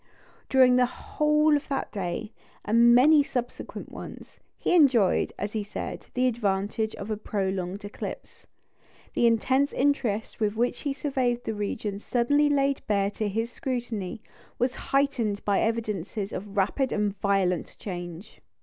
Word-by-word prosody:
During 255 -2 +6
the 250 -1 +4
whole 300 +4 +2
of 290 - -2
that 275 - -2
day 190 +2 -4 0.3
and 235 +2 +6
many 295 +4 +7
subsequent 245 -3 -5
ones, - - -10 0.2
he - - 0
enjoyed, 265 - +4
as 205 +1 -4
he 215 -2 -1
said, 205 - -6
the 250 +1 +2
advantage 215 -2 0
of 200 +2 -6
a 215 - -1
prolonged 195 -1 -3
eclipse. 205 - -8 0.7
The 235 - +3
intense 260 +5 +2
interest 255 -6 0
with 210 -1 0
which 240 +2 0
he 285 -2 -2
surveyed 255 -4 -1
the 220 - -2
region 205 -1 -3
suddenly 285 +7 +2
laid 275 -1 +1
bare 200 -1 +1
to 215 0 -2
his 225 +4 -2
scrutiny 240 - -4 0.3
was 250 +1 +1 0.2
heightened 250 -7 +1
by 200 -1 +2
evidences 215 -3 -2
of 205 +1 -6
rapid 230 +7 +1
and 210 -1 0
violent 195 -3 0
change. 175 -1 -7
225 Hz, 145 wpm, -27 LUFS, 200-260 Hz, 0.7 s, many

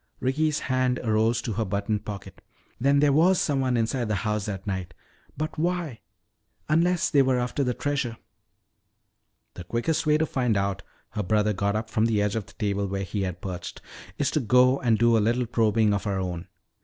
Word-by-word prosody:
Ricky's 150 +4 0
hand 130 -1 +1
arose 110 +1 +1
to 115 - -3
her 110 +3 -1
buttoned 100 +1 -2
pocket. 100 -2 -8 0.4
"Then 140 +2 +3
there 145 -1 +4
was 175 +5 +4
someone 135 -4 +1
inside 115 +1 0
the 105 - 0
house 105 -1 -1
that 95 -2 -5
night. 95 -4 -4 0.4
But 155 0 -4
why 170 -7 -1 0.7
unless 170 +3 +2
they 140 - +5
were 130 -1 +2
after 125 +3 -1
the 125 -2 -1
treasure!" 140 -5 -2 1.4
"The 90 - -8
quickest 120 - -1
way 150 0 +5
to 160 - +1
find 125 -7 0
out," 100 -1 -1 0.3
her 105 - -3
brother 105 +2 +1
got 100 +1 -1
up 110 +1 -2
from 110 +1 +2
the 110 -2 +1
edge 105 0 0
of 110 -3 -3
the - - -16
table 100 -2 -1
where 100 0 -3
he 100 +2 -3
had 90 -2 -3
perched, 90 -2 -6 0.4
"is 140 -1 0
to - - +1
go 125 +2 +4
and 115 -3 +2
do 120 +1 +4
a - - +4
little 120 +3 +1
probing 110 -2 +2
of 100 0 -2
our 100 -1 0
own. 90 -2 -4
115 Hz, 195 wpm, -26 LUFS, 100-135 Hz, 1.4 s, they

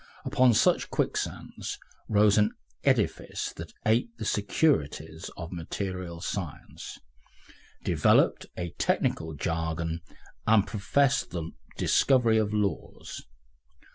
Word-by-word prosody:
Upon 125 -3 +4
such - - +3
quicksands - - -2 0.3
rose 105 -1 +5
an 105 -1 +3 0.3
edifice - - 0
that - - -7
aped 115 +1 +2
the 110 - -5
securities 80 - 0
of 85 -1 -6
material 90 0 -4
science, 90 -4 -5 0.9
developed - - +3
a 85 -1 -3
technical 80 -1 0
jargon 80 +2 -2 0.5
and 110 -2 +5
professed 135 +6 +1
the 85 -2 -4 0.3
discovery 120 -5 +4
of 105 -1 0
"laws." 105 -2 -3
100 Hz, 100 wpm, -28 LUFS, 85-110 Hz, 0.9 s, rose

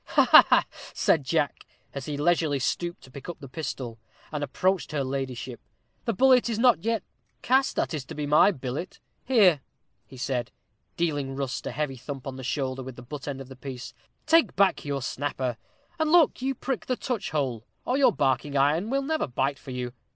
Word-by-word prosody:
"Ha, - - +3 0.2
ha!" - - +4 0.3
said 150 - +3
Jack, 150 +1 -1 0.3
as 140 -2 -6
he 145 -1 -3
leisurely 155 -1 +2
stooped 170 +6 -2
to 130 - -15
pick 140 +5 -9
up 175 - -6
the 140 - -9
pistol, 125 -5 -5 0.3
and 150 -1 -3
approached 180 +4 0
her 145 -2 0
ladyship; 130 -2 -4 0.5
"the 235 - +1
bullet 255 +3 +5
is 225 - -1
not 235 -6 +4
yet 225 -2 0 0.4
cast 265 +2 +3
that - - -1
is 150 -4 -3
to - - -9
be 150 0 -3
my 150 +6 +6
billet. 140 0 -5 0.3
Here," 200 - +5 0.6
said 125 -2 -2 0.5
he, 170 - +2
dealing 145 -4 -3
Rust 135 -2 -3
a - - -2
heavy 145 -3 -3
thump 135 +1 -7
upon 130 -1 -6
the 130 - -7
shoulder 130 0 -2
with 130 -1 -8
the 125 - -11
butt 145 +3 -8
end 135 -2 -4
of 135 - -9
the 130 - -11
piece, 130 -1 -8 0.3
"take 330 0 +4
back 195 0 +3
your 140 -2 -3
snapper, 130 -3 -2 0.4
and 315 -1 +1
look 335 -6 +5
you 270 +1 -1
prick 255 0 -3
the 255 - 0
touchhole, 145 - -2 0.2
or 250 - +1
your 265 -3 +5
barking 140 - 0
iron 155 +9 +2
will 275 +2 0
never 315 +3 -1
bite 135 +2 -1
for - - -12
you. 125 -1 -4
145 Hz, 195 wpm, -27 LUFS, 130-195 Hz, 0.6 s, my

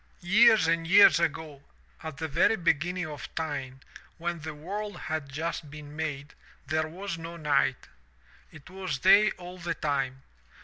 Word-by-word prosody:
'*Years 215 +1 +5
and 165 0 0
years 190 -4 +7
ago 160 -3 -2 0.4
at 160 -3 -7
the 160 +1 -3
very 160 +8 +3
beginning 175 0 0
of 150 -2 -8
time, 135 -5 -4 0.4
when 170 0 -3
the 155 0 -7
world 205 +7 -6
had 155 -3 -4
just 155 +1 -4
been 150 0 -11
made, 150 -2 -4 0.3
there 155 0 -1
was 180 +1 -6
no 165 +1 -8
night. 140 -4 0 0.6
It 155 -3 -14
was 185 -6 -4
day 200 +7 +6
all 180 0 -10
the 170 -1 -3
time. 135 -3 -2
160 Hz, 150 wpm, -28 LUFS, 150-175 Hz, 0.6 s, years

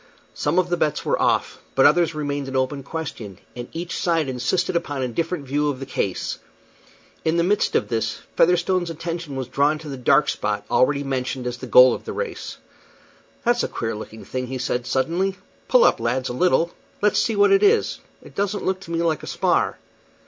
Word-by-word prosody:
Some - - -1
of 180 -1 +2
the 175 - +1
bets 150 -4 0
were - - +1
off, - - +1 0.2
but - - +5
others 170 -2 +4
remained 145 -2 -3
an 135 - -5
open 130 +2 0
question, 135 - -6 0.2
and 120 0 -6
each 170 +2 -5
side 165 -4 +1
insisted 135 +9 -1
upon 145 -6 -1
a - - 0
different 165 +4 -2
view 145 +2 0
of 135 -3 -3
the 135 - -5
case. 100 -8 -2 0.8
In 160 +1 +1
the 170 - +3
midst 200 +4 +1
of - - +2
this, 110 -1 -2
Featherstone's 180 +1 +2
attention 165 -2 -5
was 130 -2 -3
drawn 145 +4 +2
to 155 -1 -9
the 135 - -5
dark 140 +3 +4
spot 105 -1 -2
already 140 +2 +3
mentioned 130 -1 -3
as 125 0 -3
the 130 - -8
goal 125 +1 +8
of - - -6
the - - -5
race. 485 - -5 0.9
"That's 240 0 +3
a - - 0
queer 115 0 -3
looking 110 +1 -9
thing," 130 -1 -4
said 125 -1 -1
he, 125 - -13
suddenly. 175 +9 0 0.3
"Pull - - +5
up, - - +4
lads, 130 0 -1
a - - -3
little; 170 +4 +2 0.3
let's 210 - +4
see 225 - +1
what 205 0 +4
it 395 0 +5
is. 425 +2 +3 0.2
It - - -14
doesn't 200 +1 -2
look 190 0 0
to 185 - -12
me 170 0 0
like 160 -4 0
a - - -9
spar." - - +1
150 Hz, 205 wpm, -23 LUFS, 130-175 Hz, 0.9 s, goal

